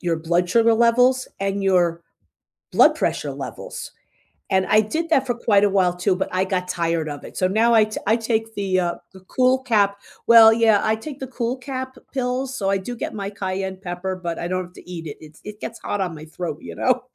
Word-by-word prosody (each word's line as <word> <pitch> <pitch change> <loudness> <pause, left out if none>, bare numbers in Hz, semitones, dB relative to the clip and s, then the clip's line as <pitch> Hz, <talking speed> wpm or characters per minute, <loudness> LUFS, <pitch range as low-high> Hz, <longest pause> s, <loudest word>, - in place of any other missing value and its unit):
your 170 -2 0
blood 170 +2 0
sugar 230 +2 +4
levels 245 +3 +3
and 195 0 -1
your 175 -3 +2 0.7
blood - - +5
pressure - - -2
levels, - - -7 0.6
and 190 -1 +2
I 215 - +5
did 315 +10 -3
that 270 -4 +3
for 245 - +1
quite 205 -4 +3
a 205 - +3
while, 185 -3 +2
too, 180 +1 +1
but 190 - -2
I 185 +1 +1
got 185 -1 -2
tired 165 -3 -1
of 145 -1 -7
it. - - -11
So 185 - +1
now 225 +4 +3
I 220 -1 +6
ta 215 - -6
I 220 - +4
take 225 -1 -2
the, 195 -2 0
uh, 175 -1 -1 0.2
the 190 - -14
CoolCap 255 -2 +2 0.3
well, 225 -1 +9
yeah, 220 -2 +4
I 220 0 +1
take 275 +5 -8
the 265 - -4
CoolCap 255 +1 -4 0.2
pills, 260 0 -2
so 195 -6 -2
I 195 - +2
do 220 +6 -6
get - - -5
my 200 -2 -4
cayenne 190 -1 -4
pepper, 185 0 -4
but 170 -2 -5
I 170 - -3
don't 185 0 -2
have 180 0 -16
to - - -15
eat 165 -2 -7
it. 145 - -7
It's 155 0 -15
it 210 0 -9
gets 230 - -6
hot 205 - -3
on 180 -3 -3
my 155 0 -10
throat, 160 -1 -5
you - - -8
know? 255 0 +1
200 Hz, 225 wpm, -22 LUFS, 180-235 Hz, 0.7 s, well